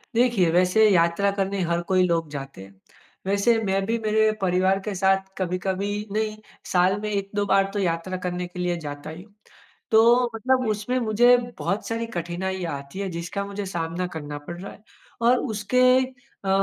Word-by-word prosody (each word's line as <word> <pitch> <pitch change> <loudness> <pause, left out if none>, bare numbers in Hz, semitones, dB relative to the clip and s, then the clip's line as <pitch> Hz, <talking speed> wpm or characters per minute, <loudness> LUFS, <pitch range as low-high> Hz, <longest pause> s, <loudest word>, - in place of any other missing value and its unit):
देखिए, 230 -8 +3
वैसे 185 +5 +4
यात्रा 170 +1 +3
करने 195 0 -1
हर 170 0 +1
कोई 185 -1 +3
लोग 165 -2 0
जाते 135 -8 -7
हैं। 100 - -15 0.5
वैसे 200 +4 +3
मैं 195 0 +1
भी 230 +3 0
मेरे 220 0 +2
परिवार 185 +1 +2
के 210 - -2
साथ 190 +1 +2
कभी-कभी 185 +2 -2 0.2
नहीं 215 0 -1 0.3
साल 185 +2 +3
में 215 - -3
1-2 205 0 -2
बार 195 -1 +3
तो 205 - -1
यात्रा 180 0 -1
करने 180 0 -2
के 180 +1 -10
लिए 175 -1 0
जाता 145 +1 -6
ही 160 +3 -9
हूँ। 205 0 -23 0.6
तो 235 +2 +5
मतलब 255 +3 +1
उसमें 215 +4 -1
मुझे 240 +2 +5 0.2
बहुत 200 +2 -2
सारी 230 0 -2
कठिनाइयाँ 175 -2 -3
आती 140 +7 -10
हैं, 200 -1 -2
जिसका 170 +4 -4
मुझे 200 0 -5
सामना 170 +2 -2
करना 145 -2 -5
पड़ 170 - -6
रहा 200 - -7
है। - - -19 0.4
और 240 +2 +4 0.2
उसके 215 +5 +1 0.6
अ, - - -1
195 Hz, 175 wpm, -24 LUFS, 175-215 Hz, 0.6 s, तो